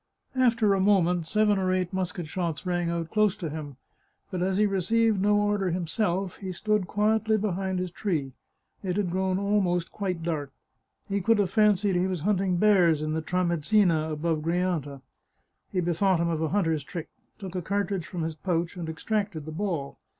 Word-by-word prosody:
After 230 -5 +3
a 195 - +1
moment 180 -4 +3
seven 210 +1 +2
or 185 -1 +1
eight 185 0 -1
musket 180 -2 -2
shots 165 -1 -3
rang 175 -1 0
out 170 -1 -3
close 215 -2 +3
to 175 -7 -5
him, 145 -4 -7 0.5
but 180 - -2
as 190 +1 +1
he 210 - +4
received 210 +2 +2
no 205 +1 +3
order 205 -2 +1
himself 180 +2 -1
he 190 -2 -5
stood 210 +1 0
quietly 220 +2 +2
behind 190 -2 -1
his 180 -1 -3
tree. 160 -8 -2 0.5
It 185 -1 -2
had 195 -4 0
grown 185 0 0
almost 190 -4 +1
quite 185 -5 -3
dark; 155 -4 -2 0.6
he 200 0 -1
could 225 +4 +3
have 195 -3 +1
fan 210 0 +5
cied 200 +1 0
he 180 +1 +1
was 185 -4 -3
hunting 190 -1 +1
bears 175 -6 +4
in 155 0 -1
the 160 - -1
Tramezzina, 170 -1 +2
above 155 +1 -1
Gri 165 +2 0
anta. 150 -7 -2 0.7
He 185 - 0
bethought 175 +1 +2
him 170 0 +1
of 160 -1 -1
a 160 - 0
hunter's 165 -6 +1
trick: 165 +3 -7 0.3
took 190 -4 -7
a 180 - -2
car 200 +4 0
tridge 185 -3 -4
from 175 -3 -4
his 160 0 -2
pouch 170 +1 -2
and 165 -2 -4
extracted 195 -1 -2
the 155 - -6
ball. 165 -5 -3
185 Hz, 195 wpm, -27 LUFS, 165-200 Hz, 0.7 s, fan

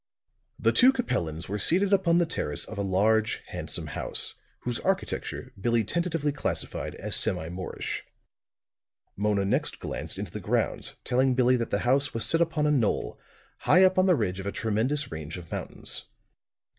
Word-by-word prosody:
The - - +2
two 255 +1 +6
Capellans 85 - -2
were 105 +2 -3
seated 190 - +5
upon 180 -3 +4
the 175 - +3
terrace 75 - -1
of - - -7
a - - +1
large, 105 +3 +1
handsome - - -4
house, - - 0 0.3
whose 120 -1 -3
architecture 190 0 -2
Billie 115 +1 +2
tentatively 165 - -1
classified 140 - -3
as - - 0
semi 80 - -1
Moorish. 90 +1 -4 1.1
Mona 100 -1 +1
next 100 - 0
glanced - - -5
into - - -5
the - - -5
grounds, - - +1
telling 130 +1 +2
Billie 125 0 +4
that 115 - -3
the 100 - 0
house 140 +2 +2
was 115 - 0
set 165 - +2
upon 160 -2 +1
a 150 - +3
knoll, 125 -8 0 0.4
high 185 - +5
up 185 0 +4
on 185 - +4
the 180 - +5
ridge 95 -7 -1
of 95 - -5
a - - -1
tremendous 120 +8 -1
range 80 +1 -6
of 85 -3 -11
mountains. - - -2
125 Hz, 170 wpm, -27 LUFS, 100-165 Hz, 1.1 s, two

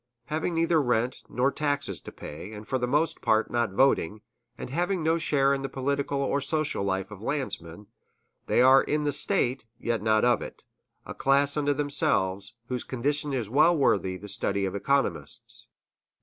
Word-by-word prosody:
Having 160 +4 -2
neither 165 -1 +3
rent 120 -1 0
nor 130 +3 +1
taxes 145 - -2
to - - -10
pay, 85 +8 -9
and 105 0 -9
for 130 - -1
the 125 - -1
most 150 +6 0
part 110 +1 +2
not 120 -1 +1
voting, 105 -3 +2 0.4
and - - -7
having 175 +3 0
no 165 +1 +2
share 140 -3 +2
in 135 - -2
the 135 - -4
political 140 +1 -1
or 140 +1 0
social 150 -5 -1
life 95 0 -2
of 105 -1 -10
landsmen, 105 - -4 0.6
they 125 - +4
are 130 +1 +7
in 150 0 -1
the 145 - +1
State, 135 - +1
yet 115 -3 -1
not 110 +1 +3
of 125 - +3
it, - - -9 0.4
a - - -7
class 140 +1 +2
unto 145 -1 +1
themselves, 110 -8 0
whose 125 0 -3
condition 145 +4 -1
is 125 -6 -2
well 155 +8 +4
worthy 95 -9 +1
the 100 +3 -10
study 100 0 -1
of 95 - -3
economists. 135 +8 -2
135 Hz, 175 wpm, -27 LUFS, 110-145 Hz, 0.6 s, are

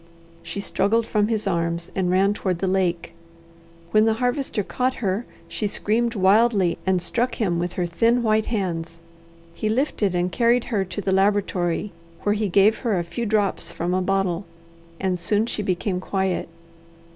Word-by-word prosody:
She 200 - -5
struggled 225 +3 +1
from 210 -2 +1
his 220 -2 -1
arms 170 -2 -1
and 185 -2 0
ran 195 +2 +3
toward 185 -4 -2
the 190 - -2
lake. 185 -3 0 0.8
When 215 0 +5
the 225 -1 +2
Harvester 245 -2 -1
caught 255 +6 -1
her, 205 +2 -2 0.2
she 210 - -2
screamed 230 +4 0
wildly, 200 -1 +3
and 190 -1 +3
struck 240 +8 -1
him 180 -6 0
with 175 0 -2
her 180 - -1
thin 230 +8 +2
white 215 -1 +2
hands. 170 -6 -3 0.6
He 215 - -2
lifted 220 -6 0
and 175 +1 0
carried 235 +5 +3
her 200 -3 +2
to 200 +3 -5
the 195 - -1
laboratory, 195 -1 +1 0.3
where 205 - +2
he 210 -1 -1
gave 200 +4 +4
her 225 -6 0
a 175 - 0
few 170 +8 -4
drops 205 -2 0
from 175 +2 -2
a 185 - +1
bottle 190 -1 0 0.5
and 185 -2 -1
soon 205 +5 +1
she 225 - -2
became 185 -1 -1
quiet. 190 -2 -1
195 Hz, 170 wpm, -23 LUFS, 180-220 Hz, 0.8 s, When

